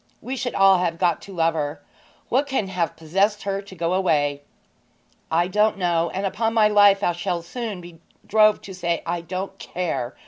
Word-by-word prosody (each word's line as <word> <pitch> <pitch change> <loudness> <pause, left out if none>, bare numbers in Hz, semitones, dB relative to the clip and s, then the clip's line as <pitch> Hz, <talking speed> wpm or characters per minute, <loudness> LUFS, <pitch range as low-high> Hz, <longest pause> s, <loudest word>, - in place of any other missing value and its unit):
We 260 - -5
should 245 -1 -3
all 195 -1 +5
have 170 -2 -1
got 170 -2 +1
to 200 - -11
love 165 -3 +1
her. 145 -2 -3 0.5
What 275 +4 +1
can 260 -8 -1
have 175 -4 -2
possessed 195 +6 0
her 195 0 -2
to 195 -1 -13
go 170 0 -1
away?' 145 -6 +1 0.9
'I 170 +2 +2
don't 210 +2 +2
know, 170 -2 +1
and, 195 +1 -3
upon 225 +3 -1
my 215 -2 +5
life, 205 -1 +5
I - - +3
shall 175 0 -3
soon 215 0 -5
be 170 -1 -13 0.3
drove 215 0 +4
to 195 - -9
say 170 -2 -2
I 170 0 -2
don't 185 +3 -5
care!' 165 -8 -3
185 Hz, 195 wpm, -23 LUFS, 170-205 Hz, 0.9 s, all